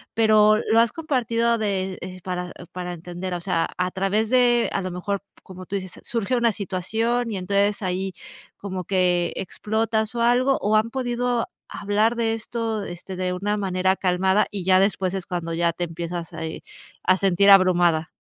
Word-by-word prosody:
pero 215 -1 +5
lo 225 +1 +2
has 230 -1 +4
compartido 235 -7 0
de, 190 -3 -2
eh, 185 +1 -7
para 180 -1 -4 0.2
para 180 -1 -5
entender, 175 +2 -5
o - - -3
sea, 165 -1 0
a 180 0 0
través 205 +5 0
de 245 -2 +4
a 200 - 0
lo 185 - -3
mejor, 190 +3 -3 0.2
como 185 -1 -11
tú 200 - -4
dices, 185 -2 -6
surge 235 +1 -1
una 235 -1 +3
situación 225 +5 -1
y 205 - -3
entonces, 200 +2 0
ahí 185 +1 -2 0.4
como 185 -3 -5
que 180 -2 +1
explotas 220 +3 -2
o 235 - -1
algo, 255 +3 +3
o 210 +1 +2
han 220 +2 +1
podido 245 -1 -1 0.3
hablar 210 +3 +1
de 225 -1 0
esto, 225 -1 -3
este, 175 +2 -8
de 180 0 -2
una 205 +3 -1
manera 190 -1 +1
calmada 190 +2 +2
y 195 -3 -4
ya 185 0 +5
después 195 -2 +1
es 190 - -4
cuando 170 -2 -4
ya 170 0 +1
te 175 +1 -3
empiezas, 170 +1 -5
a, 160 0 -5
eh, 160 - -7 0.4
a 185 +1 +4
sentir 195 +1 +3
abrumada. 175 -4 +5
195 Hz, 180 wpm, -23 LUFS, 180-225 Hz, 0.4 s, pero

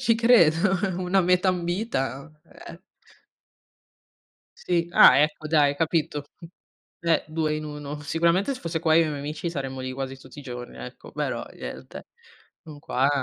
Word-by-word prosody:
Ci 230 - +3
credo, 195 -6 +4 0.2
una 185 +1 +2
meta 180 +1 +2
ambita, 170 - -2 0.4
eh. - - -11 1.8
Sì. 170 -1 -1
Ah, - - +8
ecco, 155 +1 0
dai. 145 -2 +3
Capito? 155 -2 -1 0.8
Eh, 165 -1 +1
2 155 -1 -1
in 155 - -5
1. 150 -1 -7
Sicuramente 170 - +1
se - - -11
fosse 165 -1 -3
qua 160 -1 +3
io 165 - +6
e - - -2
i - - -3
miei 145 -2 -4
amici 155 +4 -4
saremmo 135 -4 -5
lì 130 0 -4
quasi 135 0 -5
tutti 130 +1 -15
i - - -12
giorni, 125 -2 -8
ecco, 125 +1 -10
però - - -3
niente. - - -9 0.6
Non 155 -3 -11
qua 135 -1 0
155 Hz, 160 wpm, -25 LUFS, 140-175 Hz, 1.8 s, Ah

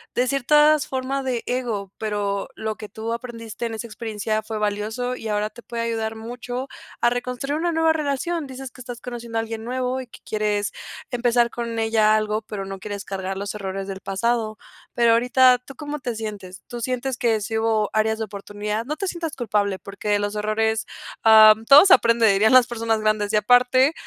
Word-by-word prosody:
decir 255 +2 +1
todas 300 +1 +5
formas 265 +1 -2
de 250 -3 -2
ego, 230 -6 -3
pero 205 -1 -2
lo 220 0 -3
que 210 -2 -9
tú 220 +2 -4
aprendiste 235 -1 -6
en 225 - -5
esa 220 - -5
experiencia 215 -1 -3
fue 220 0 -5
valioso, 215 +4 -2
y 225 - -7
ahora 210 0 0
te 240 - -13
puede 235 -1 -4
ayudar 225 -1 -2
mucho 245 +3 -6 0.3
a 240 - +5
reconstruir 250 +4 -2
una 345 +1 0
nueva 325 -1 +3
relación. 305 +1 -2
Dices 265 -1 -8
que 240 - -13
estás 245 -1 -8
conociendo 235 -2 -6
a - - +2
alguien 225 0 -6
nuevo 255 +2 -2
y 255 - -10
que - - -14
quieres 210 -1 -1 0.4
empezar 240 -1 +2
con 235 -1 -4
ella 220 -1 +3
algo, 215 0 0
pero 210 -3 -6
no 195 0 -7
quieres 200 0 -6
cargar 190 0 -4
los 200 0 -4
errores 195 -1 -5
del 195 -1 -6
pasado. 215 +2 -1 0.4
Pero 235 -1 +4
ahorita, 250 +2 +5
¿tú 265 +2 -13
cómo 300 0 -5
te 245 -3 -4
sientes? 205 -4 -7
¿Tú 240 - -6
sientes 255 +1 -2
que 230 -5 +1
sí 220 +2 -2
hubo 220 -2 +1
áreas 220 0 +1
de 220 - -3
oportunidad? 210 +1 -4
No 300 +4 -3
te 390 +4 -3
sientas 335 -3 -4
culpable, 205 -5 -1
porque 200 +1 -9
de 205 0 +3
los 205 0 -2
errores, 220 +1 0 0.4
am, 220 0 +8
todo 280 +8 +9
se 380 - +8
aprende, 230 - +5
dirían 210 +4 +4
las 255 -1 +7
personas 225 -2 -1
grandes, 215 -1 0
y - - +3
aparte, 250 +6 +4
225 Hz, 200 wpm, -23 LUFS, 215-250 Hz, 0.4 s, todo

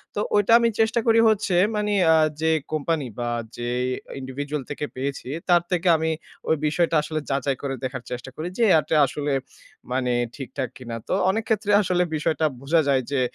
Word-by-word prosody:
তো - - -1 0.2
ওইটা 205 +2 +3
আমি 235 0 +3
চেষ্টা 225 +2 +3
করি 225 0 +5
হচ্ছে 205 -4 +1 0.2
মানে 210 0 0 0.2
আ - - +5 0.3
যে 160 - +3 0.2
কোম্পানি 155 -1 -1
বা 120 - -1 0.3
যে 120 0 -3 0.5
individual 140 +3 -4
থেকে 145 0 -3
পেয়েছি 135 0 -4 0.2
তার 175 -1 +6
থেকে 180 +1 0
আমি 160 +1 -1 0.4
ওই 160 - +4
বিষয়টা 165 +2 +1
আসলে 155 +1 -3
যাচাই 135 0 0
করে 140 -1 -3
দেখার 130 -1 -4
চেষ্টা 125 +1 -5
করি 160 - -4
যে 235 - +4
এটা 155 +1 -1
আসলে 145 +1 -2 0.6
মানে 125 -1 0 0.2
ঠিকঠাক 135 -2 -5
কিনা। 120 -3 -7
তো - - -1 0.2
অনেক 220 +4 0
ক্ষেত্রে 210 -1 +1
আসলে 180 -2 +1
বিষয়টা 155 +1 0 0.2
বুঝা 160 +4 +3
যায় 135 -2 +3
যে 140 - +1
150 Hz, 180 wpm, -24 LUFS, 135-180 Hz, 0.6 s, তার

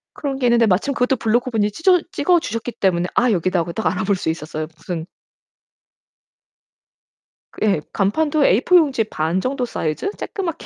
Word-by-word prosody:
그런 275 -2 -3
게 255 -2 +1
있는데 235 -1 +4
마침 210 +9 +1
그것도 250 0 +1
블로거분이 225 -2 0
찢어 360 - +3
찍어 355 -1 +2
주셨기 230 -4 -4
때문에 180 -2 0
"아 245 - +3
여기다." 185 -1 +1
하고 170 0 -3
딱 220 - -4
알아 185 - -1
볼 200 +1 +1
수 180 - -3
있었어요. 155 -1 -4
무슨 165 -1 -5 2.6
예. 200 -7 +2
간판도 295 +10 +1
A4 250 - +3
용지 275 -9 +2
반 165 -3 -2
정도 255 +1 -1
사이즈? 160 - -3
조끄맣게 340 -5 -5
220 Hz, 340 characters per minute, -20 LUFS, 180-275 Hz, 2.6 s, 있는데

